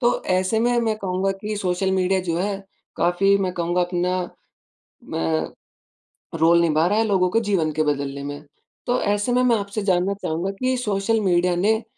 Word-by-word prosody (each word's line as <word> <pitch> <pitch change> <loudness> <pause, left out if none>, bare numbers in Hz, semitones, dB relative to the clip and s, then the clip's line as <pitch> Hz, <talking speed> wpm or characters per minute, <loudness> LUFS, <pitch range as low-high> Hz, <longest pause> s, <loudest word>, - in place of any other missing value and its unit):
तो 240 -1 +1
ऐसे 185 +4 +1
में 240 0 +2
मैं 220 -2 0
कहूँगा 190 0 -1
कि 210 0 -3
सोशल 190 0 -1
मीडिया 190 0 +1
जो 165 - 0
है, 200 0 -3 0.3
काफ़ी 195 +3 +3
मैं 185 -2 -1
कहूँगा 175 +1 0
अपना, 180 0 -1 0.7
मैं 80 -1 -1 0.9
रोल 170 +2 +5
निभा 160 -1 +2
रहा 205 +3 +1
है, - - +3
लोगों 185 -3 +2
के 225 - +3
जीवन 190 -8 0
के 155 +1 +1
बदलने 140 -1 -2
में। 145 0 -6 0.5
तो 245 0 +1
ऐसे 205 +3 0
में 250 0 +3
मैं 245 -2 +4
आपसे 200 +1 -4
जानना 185 0 +1
चाहूँगा 170 +5 -2
कि, 255 +6 -1
सोशल 215 -1 0
मीडिया 180 -2 +2
ने 220 +5 +1
190 Hz, 180 wpm, -22 LUFS, 175-205 Hz, 0.9 s, रोल